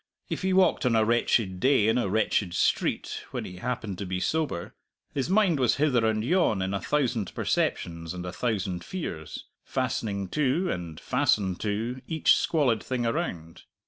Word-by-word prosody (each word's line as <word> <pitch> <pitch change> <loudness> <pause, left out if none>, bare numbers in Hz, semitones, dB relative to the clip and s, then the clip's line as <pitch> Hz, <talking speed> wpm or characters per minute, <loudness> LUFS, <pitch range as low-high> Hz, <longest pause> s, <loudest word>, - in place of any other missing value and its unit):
If - - -3
he 190 0 0
walked 185 -4 +3
on 115 - +2
a 110 -1 +4
wretched 115 -4 +1
day 130 -2 +4
in 115 +3 +3
a 100 - 0
wretched 100 -3 +1
street, - - 0
when - - -4
he 90 - -8
happened 110 -3 -4
to 100 - -3
be 90 0 -2
sober, 150 - -1 0.4
his 135 +2 -1
mind 190 -6 +3
was 125 -3 +3
hither 125 -6 +2
and 110 0 0
yon 130 - +2
in 95 +1 -2
a 100 - -2
thousand 120 -9 0
perceptions 85 -1 -1
and 90 0 -6
a 90 - -5
thousand 95 -6 -2
fears, 80 - -6 0.2
fastening 100 -3 -2
to 150 - +1
(and 85 -3 -5
fastened 95 -4 +1
to) 115 +5 -2
each 160 -2 +4
squalid 130 -9 +1
thing 125 -2 -2
around. 105 - -3
110 Hz, 175 wpm, -27 LUFS, 95-140 Hz, 0.4 s, a